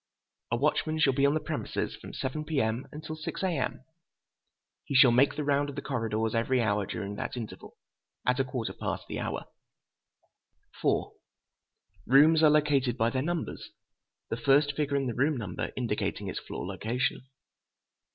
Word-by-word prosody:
A 120 Hz, -, +1 dB
watchman 150 Hz, +4 st, +1 dB
shall 145 Hz, -3 st, +4 dB
be 140 Hz, +2 st, +4 dB
on 145 Hz, -, +2 dB
the -, -, +2 dB
premises -, -, -3 dB
from -, -, -10 dB
7 145 Hz, +4 st, -3 dB
P.M. 130 Hz, -6 st, -1 dB
until 155 Hz, +1 st, -6 dB
6 160 Hz, +4 st, -5 dB
A.M. 160 Hz, -7 st, -1 dB, 1.0 s
He 140 Hz, -, -4 dB
shall 130 Hz, -1 st, +8 dB
make 130 Hz, +4 st, +4 dB
the 150 Hz, -, -2 dB
round 145 Hz, 0 st, +1 dB
of 145 Hz, -, -7 dB
the -, -, -5 dB
corridors 115 Hz, -4 st, -1 dB
every 120 Hz, +3 st, +2 dB
hour 105 Hz, -4 st, +1 dB
during 100 Hz, 0 st, -4 dB
that -, -, -4 dB
interval, 115 Hz, -3 st, -8 dB, 0.5 s
at 125 Hz, +1 st, +2 dB
a -, -, +4 dB
quarter 130 Hz, -3 st, -4 dB
past -, -, -4 dB
the -, -, -4 dB
hour. -, -, -3 dB, 2.6 s
Rooms 150 Hz, +5 st, +6 dB
are 155 Hz, -, +7 dB
located 145 Hz, -5 st, +3 dB
by 115 Hz, 0 st, +2 dB
their 130 Hz, -, 0 dB
numbers: 170 Hz, +2 st, -3 dB, 0.6 s
the 115 Hz, -, -2 dB
first 145 Hz, +2 st, +3 dB
figure 145 Hz, -1 st, 0 dB
in 135 Hz, -, 0 dB
the 120 Hz, -, -1 dB
room 140 Hz, +5 st, +1 dB
number 100 Hz, -7 st, -4 dB
indicating -, -, -2 dB
its -, -, -3 dB
floor -, -, -6 dB
location. 110 Hz, +8 st, -1 dB
135 Hz, 160 wpm, -29 LUFS, 120-150 Hz, 2.6 s, shall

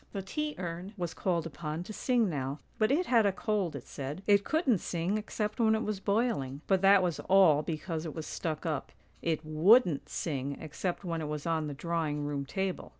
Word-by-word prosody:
" -, -, -35 dB
The 195 Hz, -2 st, -3 dB
tea 300 Hz, +9 st, -3 dB
urn 180 Hz, +3 st, -5 dB
was 175 Hz, -3 st, -3 dB
called 170 Hz, -2 st, 0 dB
upon 160 Hz, 0 st, -4 dB
to 215 Hz, -, -8 dB
sing 240 Hz, -1 st, +2 dB
now, 140 Hz, -4 st, -2 dB, 0.2 s
but 215 Hz, -, +3 dB
it 340 Hz, +6 st, +2 dB
had 230 Hz, -7 st, +4 dB
a -, -, +3 dB
cold, 200 Hz, -3 st, -1 dB
it -, -, -7 dB
said; 145 Hz, +6 st, -6 dB
it 200 Hz, -1 st, +5 dB
couldn't 285 Hz, -, +2 dB
sing 175 Hz, +5 st, -1 dB
except 215 Hz, 0 st, -3 dB
when 220 Hz, -1 st, +4 dB
it 220 Hz, -, -1 dB
was 210 Hz, -3 st, -2 dB
boiling; 200 Hz, -, 0 dB
but 190 Hz, -2 st, +2 dB
that 195 Hz, -1 st, +6 dB
was 175 Hz, -3 st, -1 dB
all 185 Hz, -6 st, +6 dB
because 160 Hz, 0 st, -4 dB
it 160 Hz, -, -6 dB
was 160 Hz, -1 st, -5 dB
stuck 160 Hz, -1 st, -4 dB
up; 155 Hz, -5 st, -2 dB, 0.3 s
it 160 Hz, -2 st, -1 dB
wouldn't 165 Hz, -, +4 dB
sing 140 Hz, -3 st, -3 dB
except 170 Hz, +5 st, -4 dB
when 165 Hz, -2 st, -2 dB
it 155 Hz, -, -3 dB
was 150 Hz, -1 st, -4 dB
on 160 Hz, -2 st, 0 dB
the 145 Hz, -, -5 dB
drawing 155 Hz, -2 st, -2 dB
room 140 Hz, -1 st, -3 dB
table. 190 Hz, +1 st, -3 dB
175 Hz, 210 wpm, -31 LUFS, 155-205 Hz, 0.3 s, that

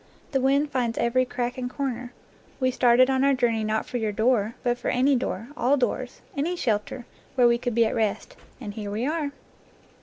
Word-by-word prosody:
The 270 Hz, -2 st, +1 dB
wind 280 Hz, +2 st, +2 dB
finds 240 Hz, -3 st, -1 dB
every 245 Hz, +2 st, +2 dB
crack 245 Hz, 0 st, -3 dB
and 250 Hz, -1 st, -3 dB
corner. 250 Hz, -3 st, -4 dB, 0.5 s
We 255 Hz, -1 st, +2 dB
started 250 Hz, 0 st, +5 dB
on 265 Hz, 0 st, +1 dB
our 275 Hz, 0 st, +4 dB
journey 230 Hz, -3 st, +1 dB
not 215 Hz, 0 st, -1 dB
for 245 Hz, -, -4 dB
your 220 Hz, -3 st, -1 dB
door, 220 Hz, 0 st, +1 dB
but 245 Hz, 0 st, 0 dB
for -, -, -5 dB
any 265 Hz, +3 st, +3 dB
door, 230 Hz, -2 st, -3 dB
all 270 Hz, +1 st, +2 dB
doors, 250 Hz, -1 st, -2 dB
any 320 Hz, +6 st, -1 dB
shelter 230 Hz, -3 st, -2 dB, 0.3 s
where 250 Hz, -3 st, +5 dB
we 235 Hz, 0 st, +3 dB
could 245 Hz, -2 st, -2 dB
be 230 Hz, -1 st, +5 dB
at 220 Hz, -, -1 dB
rest; 220 Hz, -3 st, -1 dB, 0.2 s
and 210 Hz, -5 st, -6 dB
here 205 Hz, -1 st, -5 dB
we 215 Hz, +4 st, -2 dB
are!" 300 Hz, -1 st, -1 dB
245 Hz, 205 wpm, -25 LUFS, 230-265 Hz, 0.5 s, started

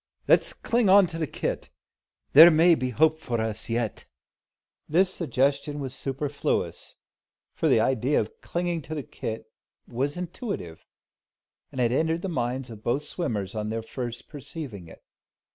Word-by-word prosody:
Let's -, -, +4 dB
cling 235 Hz, -4 st, +1 dB
on 195 Hz, 0 st, +8 dB
to 165 Hz, -1 st, -6 dB
the 160 Hz, -, -1 dB
kit. -, -, -3 dB, 0.6 s
There 160 Hz, +4 st, +11 dB
may 170 Hz, +2 st, +5 dB
be 130 Hz, -5 st, 0 dB
hope 155 Hz, +5 st, +3 dB
for 120 Hz, -6 st, -2 dB
us 110 Hz, 0 st, -2 dB
yet." 115 Hz, -1 st, -2 dB, 0.8 s
This 185 Hz, +4 st, +3 dB
suggestion 140 Hz, -2 st, 0 dB
was 135 Hz, -2 st, -5 dB
superfluous: 140 Hz, +2 st, -3 dB, 0.6 s
for -, -, 0 dB
the 110 Hz, -, +4 dB
idea 130 Hz, +4 st, +2 dB
of 110 Hz, -, -5 dB
clinging 175 Hz, -1 st, -2 dB
to 155 Hz, -, -3 dB
the 145 Hz, -, -4 dB
kit 110 Hz, -1 st, -6 dB, 0.4 s
was 135 Hz, +6 st, -2 dB
intuitive, 175 Hz, -, -6 dB, 0.8 s
and 130 Hz, -, -7 dB
had 120 Hz, -2 st, +2 dB
entered 160 Hz, +5 st, 0 dB
the 195 Hz, -, -2 dB
minds 125 Hz, -3 st, -2 dB
of 110 Hz, -2 st, -10 dB
both 125 Hz, +6 st, 0 dB
swimmers 110 Hz, -, -3 dB
on 105 Hz, -1 st, -3 dB
their 115 Hz, 0 st, -3 dB
first 120 Hz, 0 st, -6 dB
perceiving 140 Hz, -, -8 dB
it. -, -, -15 dB
135 Hz, 155 wpm, -26 LUFS, 115-160 Hz, 0.8 s, There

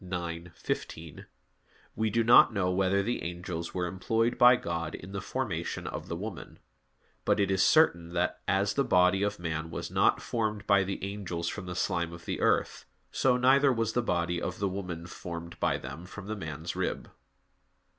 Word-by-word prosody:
ix, 85 Hz, -1 st, -5 dB
15), 80 Hz, -2 st, -5 dB, 0.7 s
we 110 Hz, +1 st, 0 dB
do 115 Hz, +2 st, +2 dB
not 120 Hz, +1 st, +7 dB
know 95 Hz, -4 st, 0 dB
whether 95 Hz, +1 st, +2 dB
the 120 Hz, +4 st, -2 dB
angels 85 Hz, 0 st, -5 dB
were 90 Hz, -1 st, 0 dB
employed 110 Hz, +6 st, 0 dB
by 125 Hz, +1 st, +7 dB
God 85 Hz, -6 st, -3 dB
in 95 Hz, -, -10 dB
the 100 Hz, -1 st, -4 dB
formation 95 Hz, -8 st, -3 dB
of -, -, -5 dB
the -, -, -3 dB
woman; -, -, -7 dB, 0.7 s
but -, -, +2 dB
it 100 Hz, -1 st, +2 dB
is 95 Hz, 0 st, +2 dB
certain 85 Hz, -, +4 dB
that, 90 Hz, 0 st, -1 dB
as 100 Hz, +1 st, +2 dB
the 140 Hz, -, +2 dB
body 90 Hz, -2 st, +3 dB
of 105 Hz, 0 st, 0 dB
man 80 Hz, -1 st, -3 dB
was -, -, -5 dB
not -, -, +3 dB
formed 105 Hz, -3 st, -2 dB
by 100 Hz, -1 st, +4 dB
the 95 Hz, 0 st, -4 dB
angels 95 Hz, -4 st, -4 dB
from 95 Hz, -3 st, -6 dB
the 90 Hz, -, -5 dB
slime 85 Hz, -1 st, -1 dB
of 85 Hz, 0 st, -11 dB
the -, -, -3 dB
earth, -, -, +1 dB, 0.3 s
so 125 Hz, -2 st, +2 dB
neither 135 Hz, +2 st, +5 dB
was 115 Hz, -2 st, 0 dB
the 120 Hz, -, +2 dB
body 85 Hz, -4 st, -1 dB
of 90 Hz, -, -3 dB
the 100 Hz, -, 0 dB
woman 90 Hz, -3 st, -5 dB
formed 85 Hz, -1 st, -8 dB
by -, -, +1 dB
them 90 Hz, +2 st, -8 dB
from 100 Hz, +1 st, -9 dB
the 110 Hz, +2 st, -4 dB
man's 80 Hz, -3 st, -5 dB
rib. -, -, -3 dB
95 Hz, 185 wpm, -29 LUFS, 85-105 Hz, 0.7 s, not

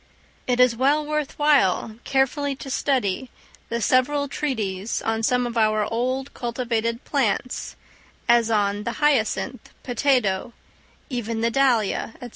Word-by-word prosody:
It 250 Hz, -1 st, +1 dB
is 250 Hz, -2 st, +5 dB
well 285 Hz, +5 st, +2 dB
worth 300 Hz, -1 st, -3 dB
while 270 Hz, -7 st, +2 dB
carefully 275 Hz, +1 st, +1 dB
to 270 Hz, 0 st, -8 dB
study 255 Hz, -3 st, 0 dB, 0.4 s
the 235 Hz, -, -1 dB
several 285 Hz, +5 st, +2 dB
treatises 220 Hz, -9 st, -2 dB
on 225 Hz, 0 st, -1 dB
some 250 Hz, +2 st, +2 dB
of 235 Hz, -1 st, -2 dB
our 215 Hz, -1 st, +2 dB
old 255 Hz, +3 st, -2 dB
cultivated 235 Hz, -1 st, -2 dB
plants, 250 Hz, -3 st, -1 dB, 0.5 s
as 235 Hz, -1 st, +4 dB
on 205 Hz, -1 st, +1 dB
the 235 Hz, -, -3 dB
hyacinth, 285 Hz, -7 st, 0 dB
potato, 245 Hz, -4 st, +1 dB, 0.6 s
even 230 Hz, -2 st, -3 dB
the 230 Hz, 0 st, +1 dB
dahlia, 235 Hz, -4 st, +1 dB
&c. 245 Hz, -2 st, -8 dB
245 Hz, 130 wpm, -23 LUFS, 225-270 Hz, 0.6 s, is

